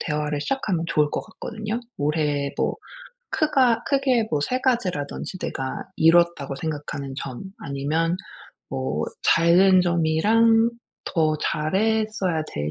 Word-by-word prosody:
대화를 150 Hz, -2 st, -2 dB
시작하면 205 Hz, -, -1 dB
좋을 150 Hz, -2 st, +2 dB
것 -, -, -2 dB
같거든요. 220 Hz, 0 st, -5 dB, 0.2 s
올해 145 Hz, -1 st, 0 dB
뭐 -, -, 0 dB, 0.5 s
크가 265 Hz, -7 st, +2 dB
크게 265 Hz, -5 st, +2 dB
뭐 150 Hz, -, 0 dB
3 250 Hz, -, 0 dB
가지라든지 190 Hz, -, -1 dB
내가 135 Hz, -6 st, -4 dB
이루었다고 165 Hz, -4 st, +3 dB
생각하는 145 Hz, -3 st, -5 dB
점 130 Hz, -2 st, -6 dB, 0.2 s
아니면 155 Hz, +5 st, -1 dB, 0.5 s
뭐 65 Hz, +4 st, -2 dB, 0.4 s
잘된 185 Hz, +2 st, +6 dB
점이랑 210 Hz, +8 st, +3 dB, 0.4 s
더 155 Hz, -2 st, +1 dB
잘했어야 195 Hz, 0 st, 0 dB
될 75 Hz, +1 st, -2 dB
165 Hz, 255 characters per minute, -24 LUFS, 150-220 Hz, 0.5 s, 잘된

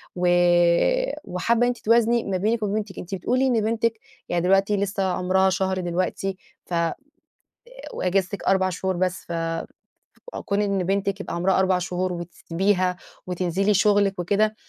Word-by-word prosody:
و 180 Hz, 0 st, 0 dB, 1.0 s
وحابة 230 Hz, +6 st, 0 dB
إن 245 Hz, -, +4 dB
أنتِ 245 Hz, -, -1 dB
توازني 235 Hz, +1 st, +3 dB
ما 190 Hz, -2 st, -2 dB
بينِك 220 Hz, +4 st, 0 dB
وبين 205 Hz, 0 st, -1 dB
بنتِك. 210 Hz, -2 st, -4 dB
أنتِ 185 Hz, +2 st, -5 dB
بتقولي 255 Hz, +8 st, +1 dB
إن 235 Hz, -4 st, +2 dB
بنتِك 225 Hz, 0 st, 0 dB, 0.3 s
يعني 175 Hz, 0 st, 0 dB
دلوقتي 195 Hz, +2 st, +3 dB
لسه 200 Hz, 0 st, -1 dB
عمرها 190 Hz, +1 st, +2 dB
شهر 190 Hz, 0 st, -1 dB
دلوقتي 185 Hz, +2 st, -2 dB, 0.3 s
ف -, -, -8 dB
آآ، 170 Hz, -1 st, 0 dB, 1.0 s
وأجازتِك 190 Hz, +2 st, -1 dB
4 190 Hz, -1 st, +2 dB
شهور 185 Hz, 0 st, -2 dB
بس 185 Hz, 0 st, -1 dB
ف 170 Hz, -, -5 dB, 1.1 s
كون 200 Hz, +1 st, 0 dB
إن 200 Hz, -2 st, 0 dB
بنتِك 195 Hz, +1 st, -1 dB
يبقى -, -, -5 dB
عمرها 185 Hz, +2 st, +2 dB
4 190 Hz, -1 st, +2 dB
شهور 180 Hz, 0 st, -2 dB
وتسيبيها 180 Hz, +2 st, -1 dB, 0.3 s
وتنزلي 185 Hz, +3 st, 0 dB
شغلِك 200 Hz, -1 st, +3 dB
وكده، 210 Hz, +5 st, +1 dB
190 Hz, 150 wpm, -24 LUFS, 180-205 Hz, 1.1 s, إن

